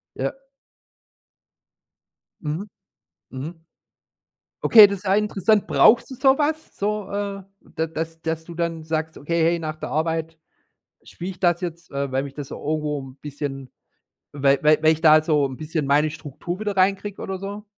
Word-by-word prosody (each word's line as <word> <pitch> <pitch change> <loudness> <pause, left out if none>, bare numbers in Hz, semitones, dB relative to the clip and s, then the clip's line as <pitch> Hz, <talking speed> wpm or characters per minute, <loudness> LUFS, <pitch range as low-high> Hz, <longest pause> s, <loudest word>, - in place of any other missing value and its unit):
Ja. - - -1 2.1
Mhm. 160 +7 -4 0.6
Mhm. 160 +5 -8 1.0
Okay, 215 -3 +9
das 200 -1 -4
ist - - -16
ja 190 +1 +3
interessant. 210 0 +2
Brauchst 235 +3 +5
du 260 - -6
so 265 +1 +4
was? 310 +1 -2
So, 210 0 -2
äh, 200 -1 -4 0.3
da 160 +1 0
dass 165 +1 -5
dass 160 0 -3
du 170 0 -10
dann 165 -1 -2
sagst: 160 0 -3
„Okay, 170 +3 -1
hey, 170 +1 +2
nach 155 -1 -4
der - - -6
Arbeit 160 0 -2 0.7
spiele 180 +2 -7
ich 180 - -18
das 175 -1 +2
jetzt, 170 -1 -6
äh, 140 -1 -3
weil 135 - +1
mich 140 -1 -8
das 145 -2 -7
so - - -7
irgendwo 150 -1 -2
'n 130 0 -12
bisschen 140 -3 -6 0.6
weil 140 -1 +2
weil 155 0 +4
weil 155 - +6
ich 160 0 -2
da 155 -1 +7
so 150 -3 +2
'n 130 - -4
bisschen 155 -1 -3
meine 145 +2 +3
Struktur 160 +4 -7
wieder 210 -2 -2
reinkriege”, 195 +1 +1
oder 190 -1 -4
so? 200 +2 -6
165 Hz, 170 wpm, -23 LUFS, 150-195 Hz, 2.1 s, Okay